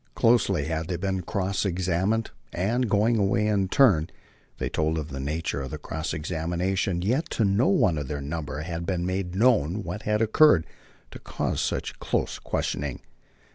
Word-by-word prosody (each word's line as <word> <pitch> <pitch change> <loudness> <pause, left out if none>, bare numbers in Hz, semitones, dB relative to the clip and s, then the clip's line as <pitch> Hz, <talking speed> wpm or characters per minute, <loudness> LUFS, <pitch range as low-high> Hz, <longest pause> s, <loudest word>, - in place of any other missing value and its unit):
Closely 100 -10 +3
had 80 +1 -2
they 90 - -2
been 95 +1 -2
cross 95 +2 -1
examined; 95 +4 0 0.2
and, 115 +7 0
going 110 +3 +3
away 100 +2 +2
in 100 -3 +1
turn, 95 - +4 0.5
they - - -2
told 80 +1 0
of 75 -1 -4
the 70 -2 -6
nature 70 0 -2
of 65 - -5
the 75 - -5
cross 80 +2 -4
examination; 85 +3 -1
yet 130 - 0
to 115 - +1
no 100 +6 +3
one 90 -5 +3
of 70 - -5
their 70 +1 -3
number 75 0 -4
had 85 +1 -4
been 90 -2 -1
made 95 -1 -2
known 105 - +3
what 105 - -5
had 105 0 0
occurred 110 - +5 0.5
to - - -9
cause - - -2
such - - -3
close - - -1
questioning. 70 -1 -3
90 Hz, 175 wpm, -26 LUFS, 80-105 Hz, 0.5 s, occurred